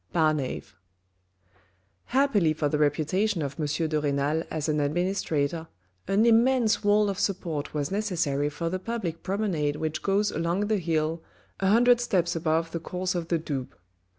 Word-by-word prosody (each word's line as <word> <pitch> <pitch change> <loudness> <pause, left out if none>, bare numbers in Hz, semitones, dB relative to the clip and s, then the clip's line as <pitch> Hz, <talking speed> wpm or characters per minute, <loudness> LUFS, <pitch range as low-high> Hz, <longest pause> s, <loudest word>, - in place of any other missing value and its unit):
— - - -33
Bamavt 155 -5 0 1.3
Happily 245 - +2
for 155 -1 -1
the 150 +1 -1
reputation 160 +6 +1
of 140 0 -5
M. 150 - 0 0.2
de 155 -1 0
Renal 145 +2 0
as 155 -1 -3
an 150 -1 +1
administrator 160 0 -1 0.4
an 205 +3 +3
immense 235 -1 +3
wall 205 0 +4
of 195 -1 -2
support 165 -7 -2
was 145 +1 -1
necessary 170 -9 0
for 165 +3 -4
the 185 +2 -2
public 190 -6 -4
promenade 185 -8 -1
which 155 0 -3
goes 200 +1 +1
along 170 +4 -1
the 210 +1 +1
hill, 160 -1 -1 0.4
a 195 - +1
hundred 240 +4 +5
steps 175 -7 +1
above 165 0 0
the 170 - -3
course 180 +2 -3
of 175 -2 -3
the 170 - +1
Doubs. 140 -5 -4
170 Hz, 160 wpm, -27 LUFS, 155-200 Hz, 1.3 s, hundred